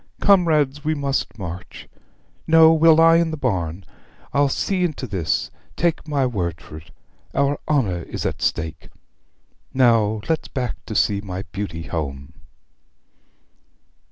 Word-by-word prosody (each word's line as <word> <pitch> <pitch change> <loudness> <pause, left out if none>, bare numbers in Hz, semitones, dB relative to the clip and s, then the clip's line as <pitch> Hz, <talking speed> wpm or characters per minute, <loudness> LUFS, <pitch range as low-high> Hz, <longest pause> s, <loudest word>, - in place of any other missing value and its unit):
Comrades, 155 -8 +3
we 155 +1 0
must 140 -5 -2
march! 90 -2 -8 0.6
No, 160 0 +7
we'll 160 0 +6
lie 165 +1 +6
in 170 -1 +2
the 155 - -4
barn. 95 - -2 0.5
I'll 140 0 +3
see 185 +6 -1
into 155 -6 -2
this, 95 -9 -2 0.2
take 165 -1 -1
my 140 -3 +1
word 90 -9 -2
for 75 - -11
't. 80 - -19 0.5
Our 140 +1 +1
honour 110 - +1
is - - -6
at - - -3
stake. 80 -1 -2 0.9
Now 115 -4 +3
let's 160 -2 -1
back 125 -3 -4
to 110 - -5
see 100 -1 +2
my 95 -2 -6
beauty 90 -5 -5
home.' 70 -2 -5
125 Hz, 135 wpm, -21 LUFS, -, 0.9 s, No